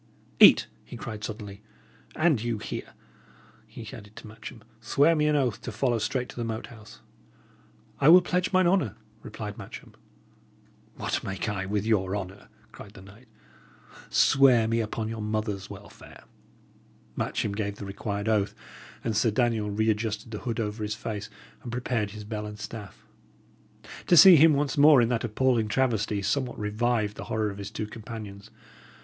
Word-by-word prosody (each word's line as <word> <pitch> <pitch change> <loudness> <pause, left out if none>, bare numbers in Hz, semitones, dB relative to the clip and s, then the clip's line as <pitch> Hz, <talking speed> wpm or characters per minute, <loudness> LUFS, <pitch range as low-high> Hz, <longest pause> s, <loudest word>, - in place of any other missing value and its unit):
"Eat!" - - +8 0.2
he - - -10
cried, 110 -3 -7
suddenly. 105 -2 -7 0.5
"And 155 -8 +2
you 120 -1 -2
here," - - -7 0.7
he 115 - -10
added 105 -1 -12
to - - -11
Matcham, 110 +1 -11 0.2
"swear 140 +8 +3
me 150 -1 +2
an 150 - +2
oath 130 -6 0
to 120 - -6
follow 120 +2 0
straight 125 +3 -2
to - - -11
the 120 - -3
Moat 110 -1 -4
House." 110 -2 -15 1.0
"I 140 - +5
will 180 +2 +8
pledge 180 +1 -1
mine 185 -1 +3
honour," 175 - +1 0.3
replied 105 -1 -7
Matcham. - - -10 1.0
"What - - -3
make 95 +1 -4
I 100 -3 -3
with 105 +1 -1
your 100 -3 +1
honour?" 95 -1 -7 0.2
cried 100 +1 -13
the 95 - -12
knight. 100 +6 -16 0.8
"Swear 130 -5 +4
me 115 +1 0
upon 110 0 -3
your 110 0 -5
mother's 105 -2 -3
welfare!" - - -13 0.9
Matcham 105 - -2
gave 100 0 -3
the 105 - -8
required 100 +1 -4
oath; 105 -2 +1 0.5
and 115 -2 -2
Sir 115 +3 +3
Daniel 110 -1 0
re 110 +2 +1
adjusted 110 0 -4
the 105 - -5
hood 115 -3 -4
over 105 0 -3
his 105 0 -2
face, 110 -3 -6 0.3
and 120 - -7
prepared 120 -3 -2
his 105 +1 -9
bell 105 0 -5
and 105 0 -8
staff. 105 -2 -9 1.0
To 175 - +5
see 185 +2 +10
him 160 +1 +6
once 145 +1 0
more 145 -1 +8
in 115 -1 +3
that 120 -2 -1
appalling 120 0 +1
travesty 110 -4 0
somewhat 125 +4 -1
revived 105 0 -1
the - - -7
horror 110 -1 -1
of 100 - -10
his 100 - -6
two 110 - -4
companions. 105 -2 -9
110 Hz, 170 wpm, -27 LUFS, 105-120 Hz, 1.0 s, see